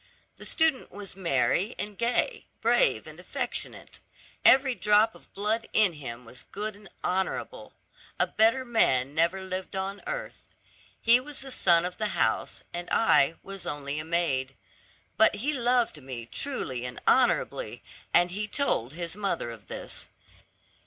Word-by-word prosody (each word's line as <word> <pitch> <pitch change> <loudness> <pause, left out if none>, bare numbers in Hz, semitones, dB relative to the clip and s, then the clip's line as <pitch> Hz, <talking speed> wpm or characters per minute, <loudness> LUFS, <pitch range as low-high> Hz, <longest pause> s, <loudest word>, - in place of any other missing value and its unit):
The - - -3
student 320 -5 +2
was 205 -2 -7
merry 180 - +1
and 205 0 -5
gay, 235 - 0
brave - - +3
and - - -11
affectionate; - - -4 0.4
every 265 0 +6
drop 215 0 +3
of - - -19
blood 215 +3 -1
in 210 -5 +4
him 125 -5 -8
was 125 +2 -12
good 210 +1 -3
and 205 -2 -15
honorable; 190 - -2 0.4
a - - +5
better 230 +4 +2
man 140 - +2
never 170 +4 +1
lived 185 +1 -5
on 195 +1 -3
earth. - - -6 0.4
He 235 +2 +5
was 290 +2 -7
the 270 0 -7
son 175 -7 +4
of 180 - -5
the 215 - 0
house, - - 0
and 175 0 -5
I 165 -8 +4
was 195 -1 -7
only 145 0 -3
a - - -3
maid; 145 -6 0 0.6
but 220 - +5
he 285 +8 -1
loved 245 - +1
me 130 -3 -7
truly 130 - -4
and 125 -1 -6
honorably, - - +2 0.3
and 175 +1 +4
he 210 +3 -3
told 205 - 0
his 170 +1 -3
mother 195 - -2
of 105 -5 -13
it. - - -5
195 Hz, 150 wpm, -28 LUFS, 155-230 Hz, 0.6 s, every